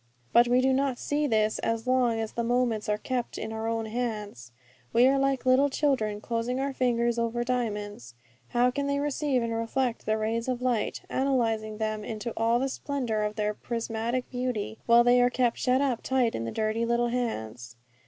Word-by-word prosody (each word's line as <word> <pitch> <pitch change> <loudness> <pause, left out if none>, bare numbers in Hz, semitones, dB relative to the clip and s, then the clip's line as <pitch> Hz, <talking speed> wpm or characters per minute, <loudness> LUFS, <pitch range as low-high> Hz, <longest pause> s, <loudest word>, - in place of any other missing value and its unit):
But 240 +1 +6
we 250 +1 +4
do 265 0 +3
not 270 -1 +1
see 295 +3 -1
this 215 -3 +1
as 230 0 -1
long 250 -3 +2
as 220 -1 -3
the 235 - -2
moments 235 -3 0
are 210 - +1
kept 245 +2 -3
in 220 0 -5
our 220 0 -3
own 225 0 -1
hands. 215 - -4 0.4
We 240 +2 +6
are 270 +1 +3
like 270 -1 0
little 260 +2 +4
children 255 -8 0
closing 235 +3 -2
our 275 0 -1
fingers 235 -2 +1
over 235 +1 -1
diamonds. 210 - -3 0.3
How 245 0 +2
can 280 +2 -2
they 280 0 0
receive 285 -3 0
and 230 0 -2
reflect 230 +1 -2
the 215 0 +2
rays 225 +2 -1
of 250 -1 -1
light, 245 -4 -1
analyzing 225 -5 0
them 215 -1 -2
into 220 +1 -5
all 230 +1 +2
the 265 +2 0
splendour 260 -6 -2
of 210 0 -2
their 210 -1 0
prismatic 230 +2 -3
beauty, 245 -4 -3
while 235 0 +7
they 245 +1 +5
are 245 - +4
kept 245 -1 0
shut 255 +1 +2
up 260 -5 0
tight 255 -3 +1
in 115 - -3
the 115 - -3
dirty 220 +1 -1
little 235 +1 +1
hands? 120 - -4
235 Hz, 195 wpm, -27 LUFS, 220-255 Hz, 0.4 s, while